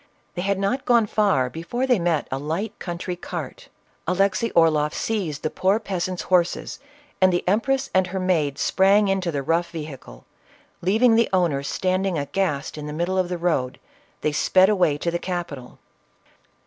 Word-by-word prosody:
They 175 - -4
had 200 +1 0
not 200 +8 -1
gone 235 -3 +4
far 200 -11 +2
before 165 - -3
they 250 -5 +3
met 170 -4 0
a 135 - -2
light 165 +9 -4
country 175 0 -4
cart. 175 - -7 0.4
Alexey 195 +4 +1
Orloff 155 -3 +3
seized 180 -10 -2
the 155 - -1
poor 195 +3 +2
peasant's 185 -3 -3
horses, 180 -1 0 0.4
and 185 0 +6
the 175 0 -1
empress 265 +8 +1
and 185 -1 +3
her 190 +1 -4
maid 160 -7 0
sprang 200 +2 +3
into 190 -3 0
the 140 -3 -3
rough 170 +4 0
vehicle; 150 - -9 0.6
leaving 220 +7 +4
the 230 0 +3
owner 175 -7 +1
standing 185 +4 -1
aghast 150 -1 -2
in 150 - -6
the 150 - -5
midst 170 +4 -1
of 185 -1 0
the 180 - -2
road, 155 -7 -1 0.4
they 155 - +1
sped 185 +5 +4
away 180 -8 +2
to 170 +3 -2
the 170 - -2
capital. 170 -9 -5
180 Hz, 170 wpm, -23 LUFS, 155-195 Hz, 0.6 s, and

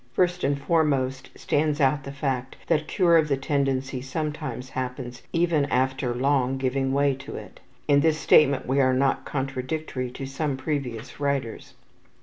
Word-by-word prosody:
First 180 -1 +1
and 140 0 +1
foremost 140 -5 0
stands 150 0 0
out 140 0 +2
the 140 - -5
fact 135 -2 -3
that 155 -2 +1
cure 170 -3 +4
of 160 -2 +3
the 140 -2 +1
tendency 135 -2 -1
sometimes 135 -2 -4
happens 125 -1 -5
even 165 -4 +2
after 130 -2 0
long 135 0 +1
giving 135 0 0
way 140 0 +3
to 140 - -9
it. - - -10 0.3
In 140 0 +5
this 155 +1 +3
statement 140 -2 +4
we 135 +2 +2
are 130 -1 +3
not 135 0 +1
contradictory 135 0 -3
to 135 +2 -7
some 135 +1 -2
previous 130 -4 -4
writers. 140 -5 -2
135 Hz, 155 wpm, -25 LUFS, 130-150 Hz, 0.3 s, In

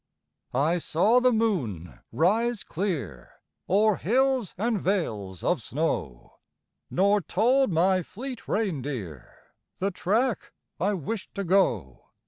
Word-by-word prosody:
I 160 +6 +2
saw 205 +10 +3
the 250 0 +4
moon 160 - -1
rise 220 +7 +1
clear 140 - -4 0.4
O'er 210 +1 +3
hills 255 +1 +1
and 220 0 0
vales 105 - -2
of - - +1
snow - - -3 0.5
Nor 200 +3 +3
told 255 +6 +2
my 185 +3 +3
fleet 245 - -8
reindeer 135 - -3 0.5
The 195 +2 -1
track 220 +6 -1 0.3
I 200 +3 +1
wished 190 +5 -5
to 200 - -2
go. 120 - +1
190 Hz, 110 wpm, -26 LUFS, 145-225 Hz, 0.5 s, the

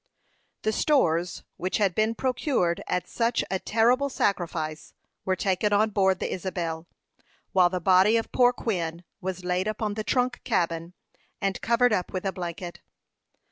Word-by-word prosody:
The 215 - +2
stores, 175 - +1
which 185 +1 -1
had 200 -4 +2
been 220 +4 +1
procured 245 - 0
at 180 - -1
such 235 0 0
a 190 - 0
terrible 245 +7 +2
sacrifice, 165 - -2 0.3
were 190 - +1
taken 195 +2 0
on 215 +2 +3
board 190 -2 +3
the - - -3
Isabel, 170 -3 -4 0.6
while 180 -2 +5
the 185 0 -2
body 190 +5 +5
of 225 - -3
poor 245 -1 +5
Quin 175 -8 -3 0.2
was 185 -1 -4
laid 180 +2 0
upon 215 -1 -2
the 215 +1 -3
trunk 250 +2 0
cabin, 170 -5 -1 0.5
and 195 -1 -1
covered 235 0 +3
up 180 -3 -1
with 185 +1 -3
a 195 - +1
blanket. 175 -1 -6
190 Hz, 155 wpm, -26 LUFS, 175-225 Hz, 0.6 s, while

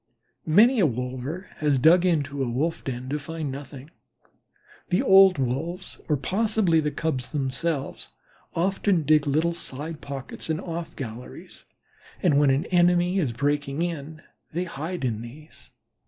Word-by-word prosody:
Many 225 +10 +5
a 180 - +5
wolver 130 - -5
has 150 -3 +2
dug 170 +7 +5
into 145 -5 0
a 130 - 0
wolf 150 +8 -1
den 125 -1 -5
to 150 +2 -1
find 155 -1 -5
nothing. 140 +1 -9 1.0
The 180 - +2
old 190 -2 +7
Wolves 160 +9 -3
or 150 - +3
possibly 200 - +1
the 150 -1 0
Cubs 145 -5 -2
themselves 140 +1 -3 0.5
often 190 0 +1
dig 150 0 +3
little 160 +4 +1
side 155 0 -5
pockets 140 +2 -7
and 160 0 0
off 170 -1 -6
galleries, 120 -1 -9 0.6
and 150 -6 +4
when 145 -1 +4
an 135 +2 +2
enemy 175 +1 +3
is 145 -9 0
breaking 145 +4 -1
in 155 -2 -5 0.3
they 175 +3 -1
hide 170 -1 -5
in 110 -3 -2
these. 145 +7 -12
155 Hz, 145 wpm, -25 LUFS, 135-175 Hz, 1.0 s, old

